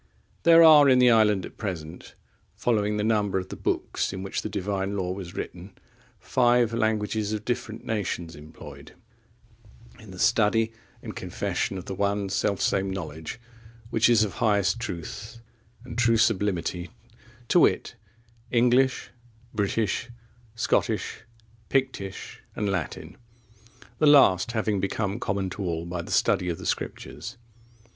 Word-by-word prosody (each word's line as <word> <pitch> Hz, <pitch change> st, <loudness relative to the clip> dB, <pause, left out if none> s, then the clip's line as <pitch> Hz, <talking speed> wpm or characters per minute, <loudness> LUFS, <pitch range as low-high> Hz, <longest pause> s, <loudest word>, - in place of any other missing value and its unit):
There 165 Hz, 0 st, +7 dB
are 150 Hz, -3 st, +8 dB
in 130 Hz, -, +6 dB
the 125 Hz, -1 st, +6 dB
island 105 Hz, -4 st, +3 dB
at -, -, -12 dB
present, 85 Hz, -5 st, -6 dB, 0.4 s
following 105 Hz, -3 st, 0 dB
the 105 Hz, -, -1 dB
number 105 Hz, -3 st, +1 dB
of 95 Hz, 0 st, -4 dB
the -, -, -6 dB
books -, -, -2 dB
in 95 Hz, 0 st, -6 dB
which 95 Hz, -, -3 dB
the -, -, -5 dB
Divine 100 Hz, +1 st, -2 dB
Law 90 Hz, -2 st, -2 dB
was 95 Hz, -1 st, -7 dB
written, 90 Hz, +2 st, -7 dB, 0.5 s
five(27) 120 Hz, -2 st, +3 dB
languages 110 Hz, -1 st, 0 dB
of 105 Hz, 0 st, -4 dB
different 115 Hz, -2 st, -4 dB
nations 90 Hz, -6 st, -3 dB
employed 75 Hz, +1 st, -12 dB, 1.0 s
in 110 Hz, -, -14 dB
the 95 Hz, -, -10 dB
study 115 Hz, +2 st, +2 dB, 0.3 s
and -, -, -7 dB
confession 95 Hz, -, -3 dB
of 90 Hz, -, -7 dB
the -, -, -5 dB
one 100 Hz, 0 st, -1 dB
self 100 Hz, 0 st, 0 dB
same 95 Hz, 0 st, +1 dB
knowledge, 80 Hz, 0 st, -6 dB, 0.5 s
which 115 Hz, +1 st, +3 dB
is 115 Hz, -2 st, +5 dB
of 105 Hz, -, -3 dB
highest 105 Hz, 0 st, +2 dB
truth 110 Hz, +2 st, -6 dB, 0.5 s
and 125 Hz, -, -6 dB
true 115 Hz, -1 st, +4 dB
sublimity, 95 Hz, -5 st, 0 dB, 0.6 s
to 175 Hz, -, +5 dB
wit, -, -, +2 dB, 0.6 s
English, 125 Hz, +2 st, +2 dB, 0.4 s
British, 110 Hz, +3 st, -1 dB, 0.5 s
Scottish, 115 Hz, -, -1 dB, 0.4 s
Pictish, 130 Hz, -8 st, -2 dB, 0.2 s
and 105 Hz, -, -1 dB
Latin, 95 Hz, -6 st, -4 dB, 0.8 s
the 155 Hz, -, +4 dB
last 120 Hz, -8 st, +5 dB
having 110 Hz, -3 st, 0 dB
become 100 Hz, +2 st, -2 dB
common 95 Hz, -4 st, -2 dB
to 100 Hz, -, -6 dB
all 85 Hz, -3 st, -2 dB
by 85 Hz, 0 st, -4 dB
the -, -, -11 dB
study 90 Hz, -, +2 dB
of 85 Hz, -, -2 dB
the -, -, -9 dB
Scriptures. 125 Hz, -, -4 dB
105 Hz, 140 wpm, -26 LUFS, 95-115 Hz, 1.0 s, are